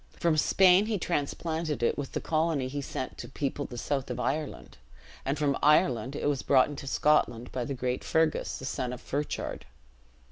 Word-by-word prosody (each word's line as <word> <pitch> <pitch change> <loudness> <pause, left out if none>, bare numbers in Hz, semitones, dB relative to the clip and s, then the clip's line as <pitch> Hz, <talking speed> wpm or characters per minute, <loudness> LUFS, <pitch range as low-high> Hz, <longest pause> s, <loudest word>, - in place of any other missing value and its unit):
From 170 -2 +2
Spain 185 +5 +5
he 220 -2 0
transplanted 160 -3 -2
it - - +2
with 140 -2 -5
the - - -1
colony 155 -4 0
he 145 +2 -4
sent 130 -1 -5
to - - -7
people 140 +1 -3
the 120 - -8
south 135 +2 -2
of - - -4
Ireland; 150 +1 -3 0.5
and 140 +3 0
from 140 -2 +1
Ireland 140 -4 +3
it - - -3
was 145 -3 +1
brought 130 -1 +4
into 140 -1 -7
Scotland 125 -5 +2
by 125 -2 -2
the 140 - -3
great 125 0 -2
Fergus, 160 -1 +1
the 130 - -8
son 125 -1 -2
of 125 - -7
Ferchard. 145 +3 -4
145 Hz, 185 wpm, -29 LUFS, 130-155 Hz, 0.5 s, Spain